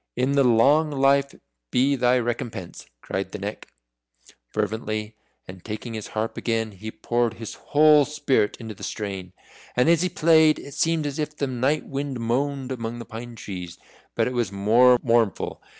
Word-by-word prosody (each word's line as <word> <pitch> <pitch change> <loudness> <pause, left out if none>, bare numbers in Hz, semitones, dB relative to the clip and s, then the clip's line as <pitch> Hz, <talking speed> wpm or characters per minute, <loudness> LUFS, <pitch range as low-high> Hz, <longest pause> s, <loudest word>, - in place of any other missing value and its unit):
"In 125 +3 +1
the 140 -1 +4
long 135 +6 +4
life 140 0 +2 0.3
be 135 +3 +2
thy 125 -1 +3
recompense!" 120 -6 -4
cried 95 0 -4
the - - -5
Neck, 105 +1 -6 0.8
fervently, 110 0 -3 0.3
and 90 -1 -11
taking 115 +2 -6
his 110 -2 -5
harp 110 +1 -2
again, 115 -2 -1
he 105 +3 -8
poured 120 +1 -1
his 115 -2 -7
whole 150 0 +5
spirit 140 -7 0
into 110 -2 -7
the 105 - -17
strain. 95 -4 -5 0.4
And 125 +4 +3
as 170 -1 +4
he 180 - +1
played, 160 -2 +4
it 140 - -10
seemed 165 0 +1
as 145 +1 -4
if 150 0 -3
the 140 - 0
night 135 +4 0
wind 140 -2 -4
moaned 135 +3 -1
among 120 -1 -4
pine 120 +1 -8
trees, 90 -5 -7 0.4
but - - +2
it 125 - -2
was 120 -5 -1
more 115 +6 +5
mournful. 115 -4 +1
120 Hz, 165 wpm, -24 LUFS, 110-140 Hz, 0.8 s, whole